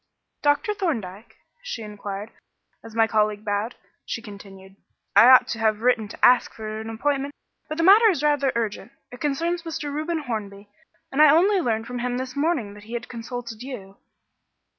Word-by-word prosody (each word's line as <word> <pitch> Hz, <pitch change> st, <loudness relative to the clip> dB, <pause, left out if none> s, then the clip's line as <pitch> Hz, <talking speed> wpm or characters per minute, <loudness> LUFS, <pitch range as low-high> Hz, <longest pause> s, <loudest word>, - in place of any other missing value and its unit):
"Dr. 290 Hz, +8 st, +2 dB
Thorndyke?" 225 Hz, -, -4 dB, 0.2 s
she -, -, -6 dB
inquired, 205 Hz, 0 st, -7 dB
and -, -, -32 dB, 0.5 s
as 225 Hz, -1 st, -12 dB
my 225 Hz, -1 st, +5 dB
colleague 215 Hz, -1 st, 0 dB
bowed, 205 Hz, +3 st, -2 dB, 0.3 s
she -, -, -4 dB
continued, 195 Hz, -3 st, -12 dB, 0.4 s
"I 225 Hz, +5 st, +8 dB
ought 255 Hz, -1 st, +8 dB
to 225 Hz, -, -3 dB
have 220 Hz, -1 st, +1 dB
written 240 Hz, -3 st, +2 dB
to -, -, 0 dB
ask 250 Hz, 0 st, +4 dB
for 215 Hz, 0 st, -6 dB
an 220 Hz, -, -7 dB
appointment 280 Hz, +5 st, -2 dB, 0.3 s
but 310 Hz, -, -4 dB
the 330 Hz, -, +1 dB
matter 420 Hz, +5 st, +7 dB
is 315 Hz, -7 st, -1 dB
rather 290 Hz, -2 st, +2 dB
urgent 230 Hz, +2 st, -3 dB, 0.2 s
it 245 Hz, -, -11 dB
concerns 335 Hz, +4 st, -1 dB
Mr. 310 Hz, -3 st, -5 dB
Reuben 310 Hz, +1 st, -2 dB
Hornby 205 Hz, -5 st, -6 dB, 0.4 s
and 275 Hz, -, +2 dB
I 305 Hz, -, +8 dB
only 370 Hz, +6 st, +4 dB
learned 225 Hz, -6 st, -1 dB
from 245 Hz, +1 st, -5 dB
him 245 Hz, 0 st, -2 dB
this 255 Hz, 0 st, -5 dB
morning 280 Hz, -8 st, 0 dB
that 205 Hz, 0 st, -14 dB
he 225 Hz, -, -10 dB
had 240 Hz, +1 st, -5 dB
consulted 235 Hz, -1 st, -7 dB
you." 210 Hz, -7 st, -8 dB
240 Hz, 185 wpm, -24 LUFS, 215-290 Hz, 0.5 s, I